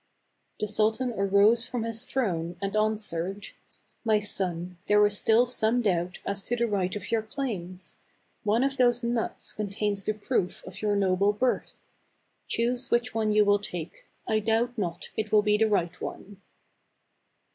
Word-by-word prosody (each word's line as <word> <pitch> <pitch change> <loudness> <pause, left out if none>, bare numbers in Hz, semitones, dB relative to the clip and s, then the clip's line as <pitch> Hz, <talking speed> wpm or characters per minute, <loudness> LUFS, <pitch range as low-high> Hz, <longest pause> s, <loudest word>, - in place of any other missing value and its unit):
The - - 0
sultan 220 +4 +1
arose 200 +4 +4
from 245 -3 -3
his 230 +1 -3
throne, 175 -9 -2
and 195 +1 -3
answered, 205 -3 -1 0.3
" - - -39
My 220 -2 +3
son, 180 -4 -3
there 210 0 +5
is 205 0 +1
still 225 +3 +4
some 240 0 +1
doubt 180 -2 0
as 200 0 -2
to 240 - 0
the 235 0 +1
right 190 -3 -1
of 205 - -6
your 225 -1 +2
claims. 195 -7 -6 0.4
One 220 +3 +2
of 275 0 0
those 245 -1 +3
nuts 235 -1 -2
con 210 -1 -3
tains 200 0 -2
the 215 - 0
proof 210 -3 -2
of 185 +1 -9
your 210 -1 +1
noble 200 +1 +2
birth. 250 +4 -1 0.7
Choose 240 +2 +1
which 240 +1 +1
one 220 -1 +1
you 210 0 +4
will 205 0 +4
take; 175 -5 -7 0.2
I 220 - +2
doubt 225 +3 +1
not 175 -6 -4
it 215 -1 -3
will 210 -1 +5
be 210 0 +3
the 220 +1 +3
right 175 -4 0
one." 200 0 -7
210 Hz, 170 wpm, -27 LUFS, 195-230 Hz, 0.7 s, there